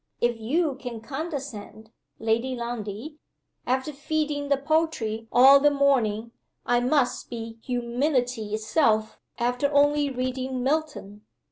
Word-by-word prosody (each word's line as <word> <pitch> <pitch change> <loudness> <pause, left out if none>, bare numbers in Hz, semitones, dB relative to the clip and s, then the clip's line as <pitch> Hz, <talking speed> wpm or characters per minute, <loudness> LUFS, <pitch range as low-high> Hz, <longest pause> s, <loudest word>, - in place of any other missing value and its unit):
"If 240 -1 0
you 280 +5 0
can 245 -4 -6
condescend, 265 -6 -6 0.3
Lady 230 +4 0
Lundie, 235 +4 -6 0.5
after 260 +4 0
feeding 295 0 -2
the 280 - +3
poultry 275 -7 -1
all 270 +3 +8
the 295 +1 +5
morning, 240 -6 +1 0.3
I 240 0 +3
must 255 +1 +1
be 230 -1 -7
humility 245 -3 -1
itself 220 -1 +1 0.2
after 245 +4 0
only 290 0 +3
reading 255 0 -3
Milton!" 265 -8 -2
255 Hz, 115 wpm, -26 LUFS, 225-285 Hz, 0.5 s, all